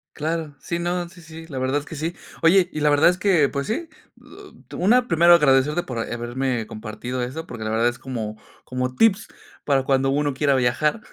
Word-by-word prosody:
Claro. 155 -1 -3
Sí, 170 +5 -4
no, 175 0 -2
sí, 175 +1 -16
sí. 160 0 -11
La 135 -5 -5
verdad 130 +3 0
es 145 - -11
que 160 - -9
sí. 160 +3 -3 0.3
Oye, 175 +2 +4
y 155 - -3
la 150 - +4
verdad 145 +3 +5
es 180 - -1
que, 185 -7 +3
pues 140 0 -4
sí. 325 +10 -2 0.3
Bu - - -21 0.4
at - - -13
una, 245 +7 +3
primero 170 +1 +5
agradecerte 150 +1 +3
por, 125 -3 -5
eh, 115 - -3
haberme 120 0 -2
compartido 110 +4 -6
eso, 135 +7 -5
porque 115 -2 -7
la 110 - -3
verdad 115 +2 +2
es 120 0 -2
como 115 -5 -5 0.3
como 125 0 -3
tips 225 - +3 0.4
para 135 -2 +2
cuando 135 0 +1
uno 145 +1 0
quiera 140 +1 +2
viajar. 130 - +1
145 Hz, 215 wpm, -22 LUFS, 125-170 Hz, 0.4 s, verdad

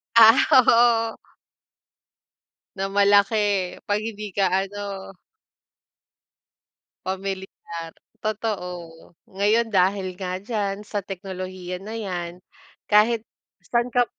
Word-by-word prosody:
Ah, 225 +2 +9
oo. 235 -2 +5 1.6
na 195 0 -2
malaki 200 +2 +4 0.5
'pag 205 0 +1
hindi 215 -2 -6
ka 195 0 +2 0.2
ano 200 -1 -7 1.9
pamilyar. 190 -3 -5 0.3
Totoo. 210 -4 -3 0.5
Ngayon 210 +3 +1
dahil 190 0 +2
nga 185 0 -4
diyan 205 -1 -3
sa 205 -1 -3
teknolohiya 185 -1 -6
na 220 +3 -6
yan, 180 -5 -4 0.5
kahit 220 +2 +3 0.4
saan 240 +3 0
kap 245 0 +3
200 Hz, 90 wpm, -24 LUFS, 190-220 Hz, 1.9 s, Ah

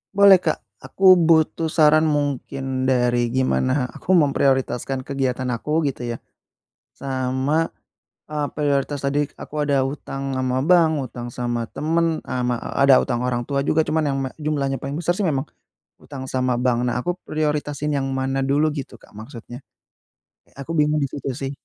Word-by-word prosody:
Boleh, 200 -2 +8
Kak. - - -2
Aku 190 -1 +5
butuh 160 -1 +3
saran, 155 0 +4
mungkin 135 -3 -2
dari 120 -2 +1
gimana 130 0 +1
aku 185 - -1
memprioritaskan 135 -4 +1
kegiatan 130 -2 -2
aku, 150 +7 -1
gitu 130 - -8
ya, - - -8 0.7
sama, 135 +4 -1 0.6
eee, 150 -1 -1
prioritas 145 -1 -1
tadi 145 +1 0
aku 150 - -10
ada 140 -2 +2
hutang 135 0 -5
sama 130 0 -1
bank, 170 0 +5
hutang 120 -2 -7
sama 120 -1 -3
temen, 165 +2 -1
e - - -10
sama 125 0 0 0.3
ada 135 -1 +6
hutang 120 -3 -2
orang 125 -1 -1
tua 140 +2 -2
juga. 160 +1 +3
Cuman 155 +1 0
yang 135 -1 -1
me 130 - -3
jumlahnya 140 -3 -1
paling 140 +1 -5
besar 170 +2 0
sih 190 +1 -1
memang 140 -4 0 0.5
hutang 135 -2 -9
sama 130 -2 0
bank. 125 -1 +1
Nah, 125 0 0
aku 175 +7 -2
prioritasin 150 -1 -2
yang 135 -1 -1
mana 135 0 -1
dulu 145 +3 +2
gitu 130 -5 -7
Kak - - -20
maksudnya? 120 +3 -10 0.8
E - - -28
aku 140 +4 -6
bingung 150 0 +2
di 140 - -1
situ 135 -2 -5
sih. 135 +1 -4
135 Hz, 165 wpm, -22 LUFS, 130-150 Hz, 0.8 s, Boleh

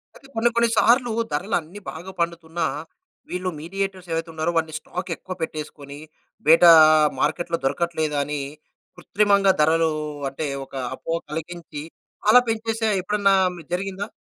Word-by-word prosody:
అయితే, 270 - -16
కొన్ని 225 +1 +3
కొన్ని 235 0 +3
సార్లూ 240 +2 +4 0.2
ధరలన్నీ 175 +2 -2
బాగా 175 +4 -9
పండుతున్నా, 170 0 -2 0.6
వీళ్ళు 180 +1 -2
మీడియేటర్స్ 190 +2 -4
ఎవైతున్నారో 165 0 -2
వాని 160 -1 -1
స్టాకెక్కువ 180 +2 -6
పెట్టేసుకొనీ, 150 -2 -6 0.5
బేటా 165 +2 +8 0.5
మార్కెట్‌లో 170 +4 0
దొరకట్లేదు 155 +1 -1
అని, 145 0 -3 0.6
కృత్రిమంగా 200 +1 +3
ధరలూ 160 +1 +3 0.4
అంటే, 150 +3 -4 0.2
ఒక 135 - -14 0.2
అపోహ 165 - -3
కలిగించి, 160 -1 -6 0.5
అలా 245 - +9
పెంచేసే 225 0 -1
ఎప్పుడన్నా 200 +1 +2 0.2
మీ 170 - -10
జరిగిందా? 195 +2 -3
170 Hz, 120 wpm, -23 LUFS, 160-195 Hz, 0.6 s, అలా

